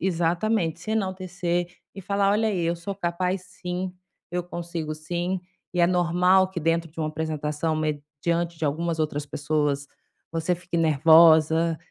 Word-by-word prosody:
exatamente. 175 0 0
Se 215 - -4
enaltecer 185 -4 -1 0.3
e 195 - -9
falar: 200 +1 +1
"Olha 215 +2 +2
aí, 185 -5 -1
eu 170 +1 0
sou 175 +4 -5
capaz 180 0 -1 0.2
sim, 180 +1 -3 0.4
eu 180 +1 -1
consigo 170 -3 -5
sim", 175 +4 -3 0.3
e 175 - +2
é 170 - +6
normal 180 +1 +3
que 180 -3 -5
dentro 165 +1 +1
de 165 - -17
uma 155 - 0
apresentação, 155 0 -2
mediante 155 +3 -2
de 160 - -3
algumas 160 +3 -1
outras 150 -1 -2
pessoas, 145 -1 -1 0.4
você 165 +2 0
fique 175 0 -5
nervosa 160 +1 +5
170 Hz, 150 wpm, -25 LUFS, 155-180 Hz, 0.4 s, é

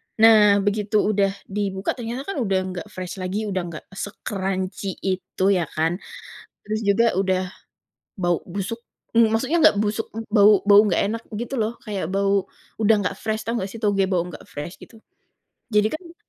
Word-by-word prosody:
Nah, 210 -3 +6
begitu 205 +1 -1 0.2
udah 200 -1 +3 0.2
dibuka, 195 -1 -2
ternyata 240 +2 -4
kan 320 - -5
udah 195 -5 +1
enggak 185 +2 -6
fresh 185 +1 -6
lagi, 185 +4 -2
udah 185 - 0
enggak 165 -2 -8
se-crunchy 195 -1 -4
itu, 185 0 -2
ya 175 -5 +1
kan, 165 +3 0 0.7
terus 215 +1 -2
juga 215 +3 +3
udah 185 0 +1 0.8
bau 175 -2 0
busuk, 200 +6 -5 0.3
maksudnya 230 +7 +3
nggak 200 - +6
busuk, 215 +1 -1 0.3
bau 205 -1 +6
bau 205 0 +8
nggak 180 - +2
enak, 230 - -5 0.2
gitu 245 +3 -4
loh, 225 +2 -3
kayak 195 -6 -3
bau 195 0 +1 0.3
udah 220 +1 +5
nggak - - -1
fresh, 220 0 -2
tahu 230 - -1
nggak 190 - -4
sih, 230 - -8
toge 205 -2 +2
bau 175 -3 +1
nggak 175 - -9
fresh 150 +5 -6
gitu, 225 - -14 0.7
jadi 210 +1 +2
kan 335 +1 -8
200 Hz, 165 wpm, -23 LUFS, 190-220 Hz, 0.8 s, bau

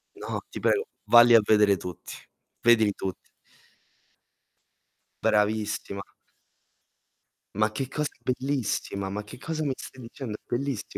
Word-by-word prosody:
No, - - -5
ti - - -7
prego. 425 - +2 0.2
Valli 120 0 +8
a - - +9
vedere 105 -1 +4
tutti. 90 -1 -8 0.5
Vedili 110 -3 +5
tutti. 95 -2 -6 2.0
Bravissima. 105 -1 0 1.5
Ma 110 +1 +2
che 130 +5 -3
cosa 150 +3 -2
bellissima! 125 -6 -2
Ma 105 +2 -4
che 105 - -11
cosa 155 +4 -4
mi 145 - 0
stai 130 - -10
dicendo? 115 0 -7
È - - -42
bellissi 125 -5 -3
110 Hz, 120 wpm, -27 LUFS, 105-130 Hz, 2.0 s, a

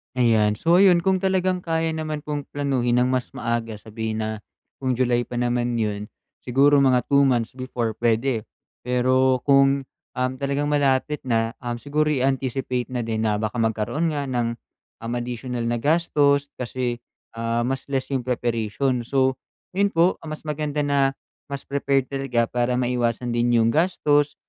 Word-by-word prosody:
Ayan. 110 -4 +3
So, 170 +1 +3
ayun 180 -2 +6
kung 190 +1 +1
talagang 185 -1 +1
kaya 165 -1 0
naman 155 -1 -3
pong 145 -1 -4
planuhin 130 -4 +1
nang 125 - +3
mas 130 -1 -1
maaga, 115 -2 -3
sabihin 110 0 -4
na 110 0 -1 0.5
kung 130 -1 -2
July 120 -1 +1
pa 120 0 -5
naman 120 -1 0
'yon 105 -1 -3 0.3
siguro 140 +3 +4
mga 130 -2 +4
2 140 0 +4
months 125 -3 +1
before 120 -4 -3
pwede. 115 0 +1 0.4
Pero 130 +1 +2
kung, 135 -1 +4 0.2
um 130 0 -1
talagang 140 +2 -1
malapit 145 0 +1
na, 115 -2 0
um, 120 -1 -3
siguro 150 +3 0
i-anticipate 130 -2 -1
na 125 - -2
din 110 -1 -1
na 105 -1 +1
baka 110 +2 -3
magkaroon 115 +8 0
nga 145 -2 -3
ng, 120 -2 0 0.5
um 115 +1 -5
additional 120 0 -4
na 120 0 -1
gastos, 145 -1 +2
kasi, 125 -1 -2 0.4
ah, 115 +1 0
mas 130 +3 -3
less 135 0 -2
yung 130 -3 -1
preparation. 120 +1 -1
So 130 -1 +1 0.3
yun 200 +2 +2
po, 170 +3 +3
ah, 160 - -11
mas 155 0 -7
maganda 150 -1 -2
na 140 -1 +2 0.3
mas 140 -1 -6
prepared 140 -1 0
talaga 125 -4 0
para 120 0 0
maiwasan 120 -1 0
din 120 0 +2
yung 115 0 +4
gastos, 145 -3 +2
130 Hz, 160 wpm, -23 LUFS, 120-140 Hz, 0.5 s, ayun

